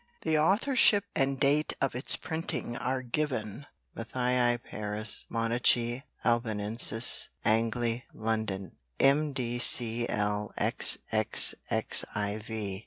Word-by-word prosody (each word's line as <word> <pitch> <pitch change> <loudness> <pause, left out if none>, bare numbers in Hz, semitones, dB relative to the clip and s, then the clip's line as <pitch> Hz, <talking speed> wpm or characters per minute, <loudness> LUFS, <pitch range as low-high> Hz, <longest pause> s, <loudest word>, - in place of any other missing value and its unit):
The 160 -1 0
authorship 205 - +3
and 135 -2 0
date 145 +2 +1
of 135 - -1
its 125 +2 +4
printing 160 -6 -5
are 130 +1 -3
given: 130 -2 -4 0.3
Matthaei 125 +1 0
Paris, 105 0 -4
Monachi 120 +1 0 0.2
Albanensis 115 0 +3 0.2
Angli 115 +2 0
London 110 -4 -4 0.2
MDCLXXXIV. 120 -4 +3
120 Hz, 75 wpm, -28 LUFS, 115-135 Hz, 0.3 s, its